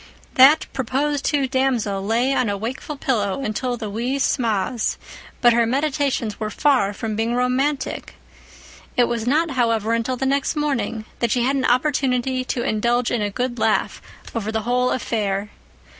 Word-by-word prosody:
That 275 +5 +6
proposed 275 +3 -1
to 285 -3 +2
damsel 250 -7 0
lay 235 +6 +1
on 250 -5 +1
a 200 - -1
wakeful 255 +7 -5
pillow 230 -2 -1
until 245 +3 -2
the 220 -2 -5
wee 235 +6 -2
sma's, 235 -3 0 0.4
but 240 -1 +6
her 235 -1 +3
meditations 275 -4 -1
were 215 - -2
far 255 -5 +2
from 215 +1 -4
being 225 +2 0
romantic. 260 +3 -1 0.8
It 245 - +6
was 235 -1 -1
not, 310 +4 +2
however, 230 -3 +1
until 230 +2 -1
the 265 - -2
next 275 +3 0
morning 235 -7 -1
that 235 - +1
she 240 +2 +1
had 270 +3 +1
an 265 -2 0
opportunity 255 -1 +1
to 245 -2 -2
indulge 235 +3 +1
in 240 - 0
a 205 - 0
good 245 +3 -3
laugh 220 0 0 0.3
over 220 -2 -2
the 220 0 -1
whole 250 +2 +1
affair. 210 -4 -2
245 Hz, 165 wpm, -22 LUFS, 225-265 Hz, 0.8 s, That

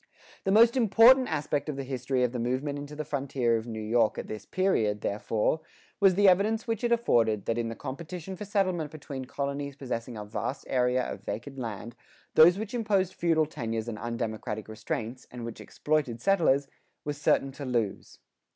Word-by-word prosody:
[82:2] - - -35 0.4
The 195 - +2
most 230 +4 +6
important 245 +3 +6
aspect 145 -1 -1
of 150 - -2
the 135 - -4
history 130 0 -1
of 125 - +1
the 125 - -4
movement 130 +5 -1
into 145 +1 -8
the 155 0 -4
frontier 135 -5 0
of 115 +1 -3
New 110 -2 -5
York 110 +1 +2
at - - -4
this 110 -1 -7
period, 110 - +1
therefore, 110 +8 0 0.4
was 195 -3 +5
the 205 +1 +5
evidence 210 +5 +3
which 225 -2 -2
it 240 - +1
afforded 115 - +2
that 115 +1 0
in 115 -1 -1
the 115 - -5
competition 170 +8 -6
for 185 - -7
settlement 185 -6 0
between 140 -3 -7
colonies 140 +1 -4
possessing 125 -3 -5
a 105 - -6
vast 110 +6 -4
area 125 0 +2
of - - -6
vacant 120 +7 -5
land, 115 0 -6 0.4
those 175 +4 +7
which 220 +2 -5
imposed 200 -6 +1
feudal 165 -2 +2
tenures 115 -6 -4
and 110 -3 -5
undemocratic 110 -2 -4
restraints, 110 +3 -5
and 120 -1 -7
which 115 - -7
exploited 150 -6 -1
settlers, 145 -4 +3 0.4
were 145 - -1
certain 140 -1 +1
to 140 - -8
lose. 120 -6 -2
135 Hz, 190 wpm, -28 LUFS, 115-175 Hz, 0.4 s, those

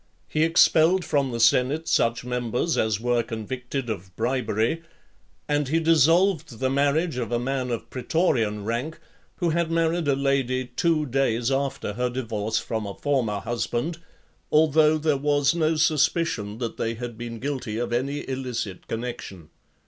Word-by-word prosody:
He 155 - -1
expelled 165 +2 +4
from 140 -3 +1
the 120 -1 -4
senate 130 +7 +3
such 115 +1 +1
members 125 +5 -1
as 110 -2 +1
were 120 0 +1
convicted 125 +4 -5
of 95 -5 -6
bribery; 120 +3 0 0.7
and 145 -1 +1
he 160 +4 +2
dissolved 165 - +3
the 130 0 0
marriage 145 +2 +1
of 120 -2 -3
a 120 - +2
man 130 +1 -2
of 120 -2 -3
pretorian 120 - 0
rank, 120 +8 -3 0.4
who 175 -3 0
had 170 0 0
married 165 0 +1
a 140 - +3
lady 135 -2 0
two 155 +5 0
days 125 -2 0
after 135 -5 -1
her 125 +3 -1
divorce 110 -3 -2
from 110 -1 -3
a 100 - -6
former 120 -8 0
husband, 120 - -2 0.5
although 155 0 +4
there 155 -2 +1
was 145 +1 +2
no 160 -1 +1
suspicion 155 -8 +1
that 120 -1 -4
they 115 0 -2
had 120 0 -6
been 115 0 -6
guilty 130 -5 -3
of 120 0 -2
any 140 +4 -2
illicit 125 -7 -4
connection. 110 -8 -6
130 Hz, 155 wpm, -25 LUFS, 115-155 Hz, 0.7 s, expelled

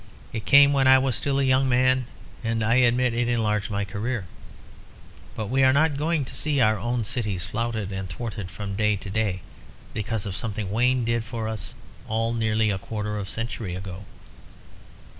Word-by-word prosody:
It 110 -2 -4
came 140 0 +7
when 135 -1 +3
I 130 0 +8
was 130 -3 +1
still 140 +4 0
a - - +2
young 130 0 +3
man, 130 0 +3 0.4
and 115 -1 0
I 115 +3 +3
admit 125 0 +3
it 120 0 0
enlarged 105 -3 0
my 100 -1 -1
career. 105 +2 -3 1.1
But 110 - -3
we 130 +6 +1
are 130 0 +6
not 150 +2 +3
going 150 0 0
to - - -9
see 145 -2 0
our 110 -3 +3
own 120 +3 -1
cities 105 -5 -2
flouted 110 -2 -3
and 95 -1 -4
thwarted 105 0 -5
from 100 +1 -6
day 105 0 +2
to 95 0 -7
day 100 -3 -1 0.5
because 110 0 -3
of 95 -2 -4
something 105 -3 -3
Wayne 125 +2 +2
did 115 0 0
for 115 -1 -4
us 110 -1 -5 0.3
all 115 +1 0
nearly 110 -1 +1
a 95 - -2
quarter 105 +1 -4
of 100 - -5
a - - -10
century 115 -5 -4
ago. 95 +1 -7
115 Hz, 190 wpm, -25 LUFS, 105-125 Hz, 1.1 s, I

